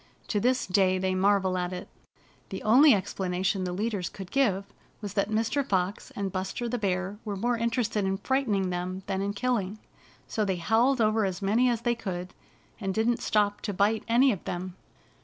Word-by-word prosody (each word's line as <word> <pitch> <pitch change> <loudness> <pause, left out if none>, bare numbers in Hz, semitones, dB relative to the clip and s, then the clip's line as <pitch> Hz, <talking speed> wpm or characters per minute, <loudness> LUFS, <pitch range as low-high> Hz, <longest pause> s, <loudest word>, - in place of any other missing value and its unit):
To 210 - +1
this 255 +4 +1
day 185 0 +3
they 185 0 0
marvel 190 -1 +2
at 180 0 -2
it. 180 -1 -6 0.6
The 190 - -6
only 265 +8 +7
explanation 185 0 -1
the 180 - -2
leaders 200 -1 -2
could 190 -2 -9
give 200 -8 +2 0.3
was 205 -3 -6
that 200 0 0
Mr. 225 +6 +1
Fox 190 -4 -1
and 200 -1 -2
Buster 190 +6 -3
the 245 +1 -2
Bear 190 0 -2
were 210 -2 -4
more 240 +5 0
inter 235 +2 0
ested 210 -2 -1
in 190 0 0
frightening 210 -8 0
them 180 +2 -4
than 195 -1 -2
in 200 +1 -1
killing. 210 -3 -1 0.5
So 215 - -1
they 185 -4 -2
bowled 240 +4 +3
over 215 0 +3
as 190 0 -2
many 230 +6 +3
as 235 -2 0
they 240 0 +1
could, 185 -5 -5 0.5
and 195 -3 -3
didn't 230 +2 +2
stop 205 -1 +1
to 205 - -3
bite 210 +3 +2
any 250 +4 +5
of 195 - -4
them. 180 +1 -4
200 Hz, 195 wpm, -28 LUFS, 185-230 Hz, 0.6 s, only